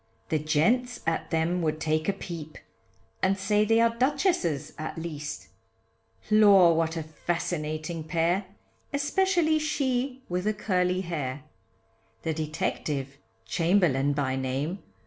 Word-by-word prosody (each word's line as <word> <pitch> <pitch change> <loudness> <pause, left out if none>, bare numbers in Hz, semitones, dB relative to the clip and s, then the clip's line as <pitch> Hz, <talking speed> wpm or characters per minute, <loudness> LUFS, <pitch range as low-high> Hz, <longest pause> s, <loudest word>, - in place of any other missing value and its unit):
The 155 - +1
gents 225 - +1
at 165 0 -1
them 165 +2 +1
would 155 -1 -1
take 155 +1 0
a - - +2
peep, 165 -5 -7 0.6
And 195 +1 +2
say 210 +2 +2
they 225 +1 +4
are 230 0 +3
duchesses 260 - +1
at 155 +1 -5
least, 150 -3 -6 0.8
Lor! 200 -5 +7
what 165 0 0
a 160 - -2
fascinating 155 0 -3
pair, 170 +4 +1 0.5
Especially 315 +2 +2
she 265 -3 -1
with 180 +2 -2
the 215 0 +1
curly 185 -3 +1
hair. 145 -6 -4 0.8
The 160 - 0
detective, 150 -3 -3 0.3
Chamberlain 155 - +2
by 135 -2 0
name. 135 +8 -2
170 Hz, 125 wpm, -27 LUFS, 155-215 Hz, 0.8 s, Lor